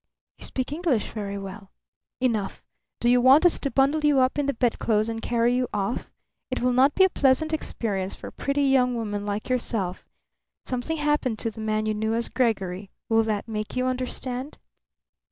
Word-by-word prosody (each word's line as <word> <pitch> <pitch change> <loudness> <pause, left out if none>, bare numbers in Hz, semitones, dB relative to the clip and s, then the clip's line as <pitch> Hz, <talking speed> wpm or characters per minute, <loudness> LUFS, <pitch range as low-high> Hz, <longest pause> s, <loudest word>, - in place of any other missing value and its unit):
"You - - -2
speak 260 +1 -2
English 300 - 0
very 200 -2 -4
well." 195 0 -8 0.5
"Enough! 225 -6 -1 0.4
Do 240 - 0
you 245 0 +5
want 270 +7 +6
us 350 - +4
to 280 - -1
bundle 275 +4 +2
you 295 -2 +4
up 255 +2 +2
in 285 - 0
the 280 - +1
bedclothes 225 -2 +1
and 225 0 -4
carry 235 +1 +1
you 250 0 +1
off? 200 +4 -2 0.4
It 255 - -2
will 250 0 +1
not 265 +3 +4
be 380 - +6
a 380 - +5
pleasant 285 +3 +2
experience 200 -10 -2
for - - -8
a - - -17
pretty 280 +1 -1
young 255 -2 +3
woman 205 -3 -3
like 205 +1 -3
yourself. 225 -7 -2 0.6
Something 255 +6 -2
happened 295 -6 0
to 225 +1 -2
the 220 - -9
man 215 0 0
you 215 - 0
knew 220 +1 -1
as 235 0 -1
Gregory. 195 -6 -1 0.2
Will 225 0 +4
that 215 -1 -2
make 215 -1 -4
you 255 0 0
understand?" 255 +1 -3
245 Hz, 190 wpm, -25 LUFS, 215-265 Hz, 0.6 s, want